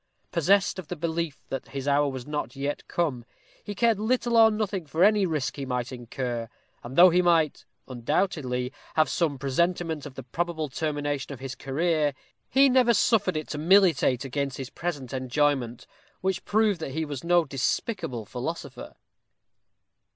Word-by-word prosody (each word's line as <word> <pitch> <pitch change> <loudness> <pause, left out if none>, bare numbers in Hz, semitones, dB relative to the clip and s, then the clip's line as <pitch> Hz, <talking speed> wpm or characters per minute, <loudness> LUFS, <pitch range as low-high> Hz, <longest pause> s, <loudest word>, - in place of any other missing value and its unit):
Possessed 190 +3 +2
of 175 - -8
the 180 - -4
belief 165 -2 -3
that 135 - -4
his 135 0 -6
hour 145 +1 +3
was 130 -2 -6
not 145 -4 -4
yet 140 +1 -4
come, 145 -9 -1 0.4
he 205 -1 -6
cared 230 -1 +2
little 240 +2 +1
or 225 -1 +8
nothing 210 -6 -2
for 160 +5 +1
any 205 -1 +4
risk 150 -5 -2
he 140 - -4
might 125 0 -2
incur; 120 -1 -4 0.3
and 125 +2 -8
though 180 +1 +8
he 180 +2 +4
might, 165 -4 +2 0.2
undoubtedly, 130 -1 -1 0.2
have 155 -1 +4
some 155 -5 0
presentiment 160 +3 -1
of 135 - -12
the 135 - -7
probable 160 +4 -3
termination 145 -1 -2
of 130 - -10
his 135 -1 -5
career, 150 +1 0 0.3
he 275 +1 +5
never 250 -3 +4
suffered 190 -4 +2
it 155 - -4
to 150 - -4
militate 165 -7 +4
against 135 0 -2
his 135 0 -6
present 145 -8 -4
enjoyment, 130 -2 0 0.4
which 190 0 -1
proved 210 -3 +2
that 140 -4 -5
he 160 0 -1
was 145 -3 -6
no 175 -1 +3
despicable 130 - -2
philosopher. - - -6
150 Hz, 165 wpm, -26 LUFS, 135-180 Hz, 0.4 s, or